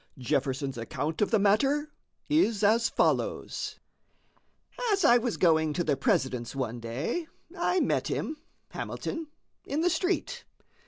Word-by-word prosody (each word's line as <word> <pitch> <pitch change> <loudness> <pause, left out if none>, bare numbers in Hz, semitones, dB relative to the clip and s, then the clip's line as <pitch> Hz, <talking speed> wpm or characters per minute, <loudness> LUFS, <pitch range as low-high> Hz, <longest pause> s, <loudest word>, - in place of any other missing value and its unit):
Jefferson's 135 +1 -1
account 150 - -3
of 210 - +3
the 225 - +4
matter 270 +9 +2 0.4
is 230 - +2
as 225 +3 +4
follows: - - -1 1.1
"As 390 -4 +2
I 240 -2 +7
was 235 -1 -2
going 160 -3 +3
to 175 - 0
the 150 -3 +1
President's 135 - 0
one 120 -3 -3
day, 130 - -3 0.3
I 355 0 +1
met - - +1
him 310 - -2 0.3
(Hamilton) 325 -1 -5 0.4
in 295 +3 -2
the 355 +1 +3
street. 360 +3 -1
210 Hz, 130 wpm, -28 LUFS, -, 1.1 s, I